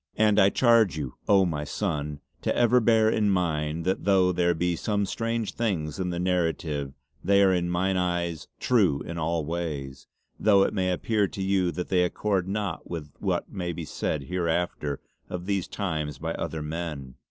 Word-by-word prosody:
And 105 -1 +4
I 95 - +6
charge 115 - +4
you, 70 -5 -4 0.2
oh! 95 -2 +6
my 75 -4 -2
sonne 75 -3 -3 0.2
to - - 0
ever 120 +1 +4
bear 110 -1 +4
in 110 -1 +2
mind 80 -3 0
that 95 +1 0
though 95 -2 +4
there 85 -1 +2
be 90 +1 0
some 100 +3 0
strange 115 +2 -2
things 85 -10 -2
in 90 -1 -1
the 85 - -3
narrative 80 -6 -1 0.3
they 100 0 +4
are 95 -1 +5
in 85 -1 0
mine 95 +2 +1
own - - +2
eyes 85 -3 -2
true 95 - +2
in 85 0 -5
all 80 -1 -1
ways, 75 -6 -4 0.3
though 100 -2 +5
it - - 0
may 95 -3 0
appear 105 +3 +1
to 95 - -5
you 95 -2 +2
that 90 - -4
they 90 -1 +3
accord 95 +1 0
not 100 -3 -3
with 80 -4 -6
what - - -1
may 90 -2 -3
be 85 0 -5
said 75 -1 -2
hereafter 85 -3 -1 0.3
of 90 0 -5
these 100 -2 -1
time's 80 -7 -3
by 80 +1 -3
other 80 -2 -4
men. 75 -4 -5
90 Hz, 185 wpm, -26 LUFS, 80-100 Hz, 0.3 s, I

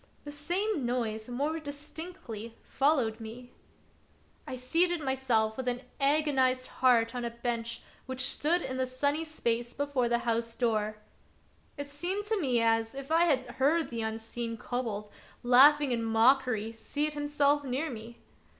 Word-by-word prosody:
The 290 - -7
same 350 +4 -1
noise 230 -2 -2
more 290 +6 -1
distinctly 285 - -7
fol 285 +3 +2
lowed 225 -5 -1
me. 235 +3 -9 1.0
I - - -4
seated 335 +8 +2
myself 255 -6 +1
with 260 -1 -4
an 245 0 -1 0.2
agonized 275 -3 +2
heart 235 -2 +3
on 245 -1 -3
a 235 - -1
bench 235 0 -4 0.2
which 260 0 -3
stood 335 +6 +1
in 260 - -4
the 260 0 0
sunny 285 +5 0
space 240 -6 -2
before 285 -4 0
the 235 - +3
house 230 0 0
door. 215 -3 0 0.8
It 285 - -4
seemed 350 +8 -3 0.4
as. 225 +1 +1
if 275 +2 -7
I 330 +1 +5
had 265 -6 +2
heard 300 +4 +2
the 230 -1 -3
unseen 225 +1 -4
kobold, 220 -4 -4 0.3
laughing 275 +3 +6
in 230 -1 0
mockery, 225 -1 +3
seat 295 +7 -2
himself 290 0 +1
near 275 +3 -2
me. 230 0 -9
255 Hz, 145 wpm, -30 LUFS, 230-290 Hz, 1.0 s, laughing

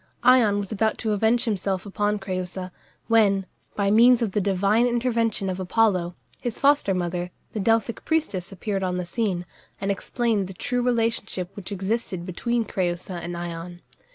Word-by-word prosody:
Ion 240 -5 +5
was 200 -2 -3
about 220 +1 +1
to 220 - -1
avenge 225 +4 +2
himself 195 -3 -1
upon 205 +1 0
Crëusa, 185 -1 -4 0.3
when, 205 -4 +3 0.3
by 200 -1 +1
means 235 +2 +6
of 215 - -1
the 205 - +1
divine 200 +5 +2
intervention 230 -4 0
of 185 0 -2
Apollo, 185 -2 +1 0.2
his 240 -3 -3
foster 280 -9 +3
mother, 175 0 -2 0.2
the 215 - -2
Delphic 225 +2 +1
priestess 300 - -1
appeared 195 +1 -3
on 180 -1 -1
the 180 - -2
scene, 185 -3 -1 0.3
and 195 0 0
explained 215 -1 0
the 190 - -8
true 245 +5 -1
relationship 230 -6 0
which 200 -1 -8
existed 195 -2 -2
between 230 +6 -1
Crëusa 180 -2 -2
and 175 0 -5
Ion. 175 0 -6
200 Hz, 160 wpm, -25 LUFS, 185-230 Hz, 0.3 s, means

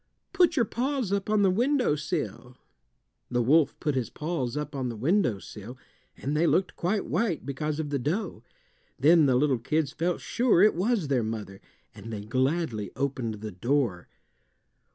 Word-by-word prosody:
"Put 350 -3 +4
your 240 -6 +3
paws 255 -2 -2
up 200 +1 -1
on 210 -1 +3
the 190 - +4
windowsill." 150 - -1 0.7
The 120 0 +1
wolf 150 +4 +3
put 150 - 0
his 130 -3 -1
paws 150 -5 -3
up 150 0 -4
on 130 -2 -2
the 115 - -5
windowsill, 120 - -1 0.4
and 140 +3 -3
they 165 +3 +3
looked 185 -1 +1
quite 195 +4 -1
white 185 -2 -1
because 150 +2 -3
of 150 -2 -3
the 140 - 0
dough. 165 - -2 0.6
Then 155 +2 +5
the 130 - +3
little 135 -1 +2
kids 150 +4 0
felt 170 +3 -1
sure 235 -7 +3
it 210 - +6
was 195 -1 0
their 135 -3 +1
mother, 105 -3 -5 0.3
and 110 +3 -9
they 105 -2 -4
gladly 130 - -1
opened 125 -6 -3
the 110 -1 -5
door. 115 -2 -1
145 Hz, 165 wpm, -27 LUFS, 120-180 Hz, 0.7 s, it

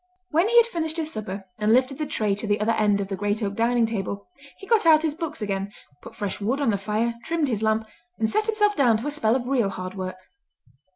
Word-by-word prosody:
When 335 +7 +3
he 475 - +3
had 470 - +8
finished 330 -7 -2
his 315 -1 -1
supper, 200 -2 -5
and 210 +1 +2
lifted 260 +3 +2
the 305 - -2
tray 215 -8 0
to 210 +3 -4
the 205 0 +1
other 215 +2 +1
end 210 -2 +2
of 200 - -2
the 195 - -2
great 205 +3 -1
oak 200 -1 -1
dining 235 +2 +2
table, 200 -2 -4 0.3
he 390 - -11
got 450 0 +3
out 320 -2 +6
his 315 -2 +1
books 320 -8 -5
again, 195 -1 -2 0.3
put - - -12
fresh 205 0 -4
wood 245 +7 0
on 280 -6 +2
the 200 - -1
fire, 215 +4 -1
trimmed 320 -3 0
his 220 -4 -1
lamp, 220 0 +1 0.3
and 220 - +1
set 430 - 0
himself 420 -2 +2
down 245 -7 +4
to 230 - -6
a 295 - -1
spell 230 -6 +1
of 245 -2 -2
real 245 -7 +2
hard 185 -1 -6
work. 185 -1 -5
225 Hz, 250 wpm, -24 LUFS, 205-305 Hz, 0.3 s, had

